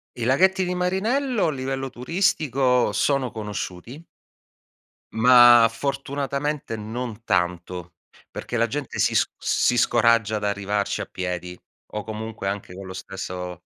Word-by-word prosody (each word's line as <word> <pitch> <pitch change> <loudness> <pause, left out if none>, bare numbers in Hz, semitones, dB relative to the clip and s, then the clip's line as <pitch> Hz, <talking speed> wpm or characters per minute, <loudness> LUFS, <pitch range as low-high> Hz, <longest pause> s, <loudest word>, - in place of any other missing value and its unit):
I 120 - -3
laghetti 190 - +3
di 180 0 -2
Marinello 215 +7 0
a - - +1
livello 135 -1 -3
turistico 130 - +1
sono 135 +2 +1
conosciuti 110 - -6 1.1
ma 120 0 +8
fortunatamente 140 +2 -3
non 115 +1 -6
tanto, 90 -3 -2 0.4
perché 120 - -5
la 115 - +3
gente 140 +3 -5
si - - +2
sc - - +2
si 125 - +1
scoraggia 115 -2 +3
ad 105 - -6
arrivarci 100 0 -1
a - - -4
piedi 90 -1 -5 0.4
o 105 - -4
comunque 110 -1 -6
anche 100 -2 -4
con 95 +1 -9
lo 95 - -7
stesso 90 -2 -6
115 Hz, 130 wpm, -24 LUFS, 100-140 Hz, 1.1 s, ma